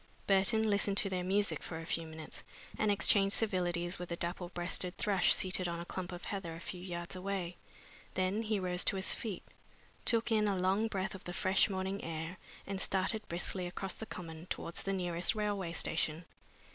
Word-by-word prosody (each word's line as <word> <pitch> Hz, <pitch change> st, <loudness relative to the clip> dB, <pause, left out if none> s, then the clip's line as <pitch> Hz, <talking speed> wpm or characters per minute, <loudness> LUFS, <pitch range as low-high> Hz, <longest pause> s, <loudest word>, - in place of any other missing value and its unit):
Burton 200 Hz, +3 st, +4 dB
listened 200 Hz, -1 st, +2 dB
to 195 Hz, -, +2 dB
their 180 Hz, -1 st, 0 dB
music 200 Hz, +3 st, +2 dB
for 160 Hz, -, -5 dB
a 165 Hz, -, -6 dB
few 165 Hz, 0 st, -1 dB
minutes, 160 Hz, 0 st, -8 dB, 0.3 s
and 215 Hz, -, +1 dB
exchanged 200 Hz, 0 st, +4 dB
civilities 175 Hz, -4 st, +1 dB
with 180 Hz, -1 st, -6 dB
a -, -, 0 dB
dapple 175 Hz, +1 st, -3 dB
breasted 180 Hz, +1 st, -1 dB
thrush 195 Hz, -4 st, +4 dB
seated 185 Hz, -1 st, +3 dB
on 170 Hz, 0 st, -2 dB
a 170 Hz, -, -5 dB
clump 180 Hz, 0 st, -4 dB
of 175 Hz, 0 st, -7 dB
heather 185 Hz, -5 st, -4 dB
a -, -, -8 dB
few 175 Hz, +1 st, -6 dB
yards 175 Hz, -1 st, -5 dB
away. 185 Hz, -2 st, -2 dB, 0.6 s
Then 185 Hz, +3 st, +1 dB
he 215 Hz, -2 st, 0 dB
rose 180 Hz, -1 st, +1 dB
to -, -, +3 dB
his 190 Hz, 0 st, +2 dB
feet, 215 Hz, -5 st, -4 dB, 0.6 s
took 230 Hz, 0 st, +3 dB
in 215 Hz, -1 st, +4 dB
a 200 Hz, -2 st, +1 dB
long 190 Hz, +4 st, +2 dB
breath 195 Hz, -2 st, -2 dB
of 190 Hz, -, -9 dB
the 175 Hz, -, -4 dB
fresh 190 Hz, +4 st, +3 dB
morning 190 Hz, 0 st, -2 dB
air, 165 Hz, +2 st, -4 dB, 0.3 s
and 195 Hz, 0 st, -3 dB
started 195 Hz, +3 st, +1 dB
briskly 175 Hz, +1 st, +1 dB
across 190 Hz, +1 st, -3 dB
the 220 Hz, -, -7 dB
Common 165 Hz, -1 st, -7 dB
towards 170 Hz, -, -3 dB
the 195 Hz, -, -2 dB
nearest 175 Hz, +1 st, +2 dB
railway 205 Hz, -5 st, -1 dB
station. 165 Hz, 0 st, 0 dB
185 Hz, 195 wpm, -34 LUFS, 175-200 Hz, 0.6 s, Burton